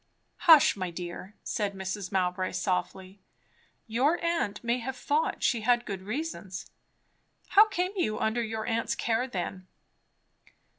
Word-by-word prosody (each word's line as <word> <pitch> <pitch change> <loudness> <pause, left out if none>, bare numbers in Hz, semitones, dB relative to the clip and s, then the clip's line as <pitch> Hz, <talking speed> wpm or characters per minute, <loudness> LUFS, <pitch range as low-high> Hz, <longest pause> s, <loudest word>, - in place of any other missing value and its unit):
"Hush, 315 -7 +8
my 185 -3 -3
dear," 175 +3 -7
said 205 -2 -2
Mrs. 190 0 -4
Mowbray 185 -1 0
softly. 185 +1 -2 0.6
"Your 260 +9 +1
aunt 285 -13 -1
may 235 +1 +1
have 255 +2 -4
thought 300 +5 0
she 235 - +2
had 240 +2 +2
good 195 -2 -5
reasons. 215 - -5 0.8
How 420 +2 +7
came 365 -3 -1
you 215 - 0
under 220 +2 0
your 220 -1 -3
aunt's 230 0 -1
care 235 +2 0
then?" 185 -3 -5
220 Hz, 135 wpm, -29 LUFS, 190-255 Hz, 0.8 s, Hush